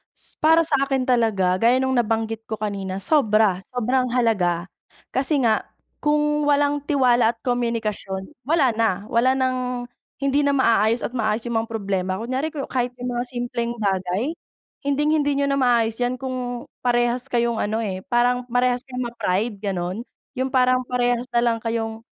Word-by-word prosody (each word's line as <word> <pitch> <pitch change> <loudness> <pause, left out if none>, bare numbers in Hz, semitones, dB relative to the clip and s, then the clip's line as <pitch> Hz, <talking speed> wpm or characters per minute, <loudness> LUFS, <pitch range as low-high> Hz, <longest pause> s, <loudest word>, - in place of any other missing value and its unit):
S - - -10
para 325 +2 +5
sa 300 -4 +1
akin 270 -2 0
talaga, 215 -7 +2
gaya 235 +2 +4
nung 260 - 0
nabanggit 225 0 -1
ko 220 - -3
kanina, 195 -2 -4
sobra, 215 - +3 0.2
sobrang 250 +2 +1
halaga. 190 -8 +1 0.5
Kasi 275 +1 +1
nga 220 -2 +2 0.3
kung 295 0 +1
walang 290 0 +3
tiwala 245 -5 +3
at - - -40
komunikasyon, 225 -6 -2 0.2
wala 295 -6 +3
na. 225 0 +3 0.2
Wala 255 +3 +3
ng 255 -1 -1 0.4
hindi 275 +1 +2
na 280 - +2
maaayos 230 -3 +3
at - - -2
maayos 220 -2 -1
yung 235 -2 0
mga 225 - -3
problema. 195 -4 -2
Kunyari, 255 +8 -2
ku 300 -3 -5
kahit 250 -1 -2
yung 245 0 -4
mga 240 0 -2
simpleng 240 -1 -3
bagay, 195 - -1 0.6
hinding-hindi 290 0 +2
niyo 280 - +1
na 275 - +1
maaayos 235 -2 +2
'yan 245 +1 0
kung 250 -2 -4 0.2
parehas 240 +1 +1
kayong 235 -3 0
ano, 220 +2 -1
eh, 190 -3 -3
parang 245 +1 +1
parehas 250 +1 +1
kayong 255 -1 -4
ma-pride, 210 -1 -1
gano'n? 190 -1 -3 0.4
Yung 260 - +1
parang 255 -1 +3
parehas 245 0 0
na 235 - +4
lang 230 -1 +1
kayong 225 -1 -3
240 Hz, 165 wpm, -23 LUFS, 220-260 Hz, 0.6 s, para